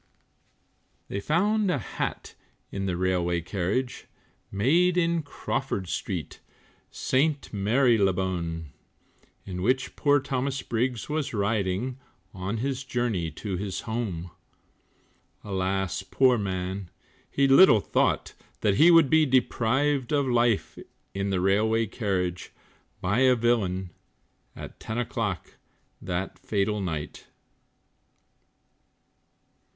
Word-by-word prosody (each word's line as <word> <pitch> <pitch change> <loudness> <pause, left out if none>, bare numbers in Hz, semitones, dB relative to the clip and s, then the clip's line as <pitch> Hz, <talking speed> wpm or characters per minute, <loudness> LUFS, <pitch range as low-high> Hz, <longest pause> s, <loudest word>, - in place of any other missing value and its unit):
They 100 - -3
found 200 - +1
a 180 - +1
hat 110 - -4 0.4
in 95 0 -3
the 90 -2 -1
railway 90 -1 0
carriage, 100 +8 -2 0.4
Made 170 - +3
in 170 -1 +2
Crawford 135 - -3
street, 90 -8 -4 0.5
St. 140 +1 0
Marylebone, 95 - +1 0.7
In 90 -2 -5
which 130 +6 0
poor 145 -1 +3
Thomas 135 0 -2
Briggs 120 0 -1
was 150 -4 -2
riding, 105 +4 -1 0.3
On 95 +4 -3
his 135 +3 -2
journey 120 -10 -1
to 95 +2 -5
his 95 -1 -4
home; 100 -7 -4 1.1
Alas, 95 -1 -1
poor 125 +6 +3
man, 95 -2 -3 0.4
he 140 0 +2
little 135 - +7
thought - - 0 0.3
That 100 -2 +2
he 165 - +7
would 165 -4 +7
be 155 +1 +4
deprived 130 +1 +1
of 145 -2 +2
life, 120 -3 +1 0.3
In 100 0 -2
the 95 -2 0
railway 110 +4 +2
carriage, 95 -5 -2 0.5
by 100 +6 +1
a 130 -1 +5
villain, 100 -6 0 0.6
At - - -10
ten 110 - -5
o'clock 115 -5 -3 0.4
that 95 +1 -4
fatal 105 0 -1
night. 80 -5 -5
110 Hz, 105 wpm, -26 LUFS, 95-130 Hz, 1.1 s, little